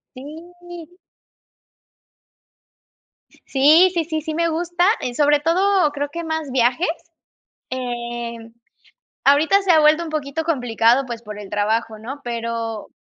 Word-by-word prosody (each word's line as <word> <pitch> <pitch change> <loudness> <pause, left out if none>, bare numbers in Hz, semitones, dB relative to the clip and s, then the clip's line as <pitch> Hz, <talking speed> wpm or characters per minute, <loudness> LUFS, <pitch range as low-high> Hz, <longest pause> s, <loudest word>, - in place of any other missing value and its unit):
Sí. 345 +4 -12 2.5
Sí, 310 +7 +5
sí, 335 -2 0
sí, 315 -1 -3
sí 315 0 -5
me 335 +1 +1
gusta, 345 +2 -1 0.2
eh, 245 - -4
sobre 295 +1 +3
todo, 365 +1 +2
creo 285 0 -3
que 340 +1 -6
más 315 -3 -3
viajes, 250 +6 +1 0.8
eh, 240 -2 -5 0.9
ahorita 310 +8 +4
se 390 - -1
ha 320 -2 +6
vuelto 305 +2 +4
un 320 - -7
poquito 305 +1 -3
complicado, 245 -4 +2
pues, 235 -1 -7
por 210 -2 -9
el 205 -2 -10
trabajo, 220 +1 -1
¿no? 265 +6 -8
Pero 230 -2 -4
290 Hz, 130 wpm, -20 LUFS, 240-330 Hz, 2.5 s, ha